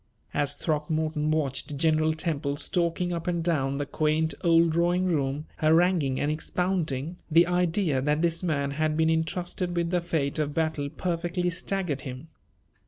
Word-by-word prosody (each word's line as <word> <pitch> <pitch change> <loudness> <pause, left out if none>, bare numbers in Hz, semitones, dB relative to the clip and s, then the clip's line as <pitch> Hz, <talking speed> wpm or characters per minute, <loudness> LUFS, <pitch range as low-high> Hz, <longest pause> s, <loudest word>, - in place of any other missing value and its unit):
As 145 -1 0
Throckmorton 155 0 -1
watched 145 -1 -1
General 155 +1 +2
Temple 150 -4 -1
stalking 175 +2 0
up 170 0 -4
and 170 -2 0
down 140 -5 0
the 145 - -2
quaint 155 +2 0
old 165 -1 +4
drawing 175 +3 +2
room, 145 -4 -1
haranguing 160 -4 +3
and 145 - 0
expounding, 165 -2 -1
the 165 +2 +6
idea 175 -4 +1
that 150 +3 +1
this 170 -1 +2
man 140 -6 -1
had 155 +1 0
been 160 0 +3
intrusted 175 +2 -2
with 170 0 0
the 180 -1 +1
fate 155 -4 -1
of 150 -1 -1
battle 155 -3 -1
perfectly 175 +2 -2
staggered 180 -5 -2
him. 130 +3 -8
160 Hz, 155 wpm, -27 LUFS, 150-175 Hz, -, the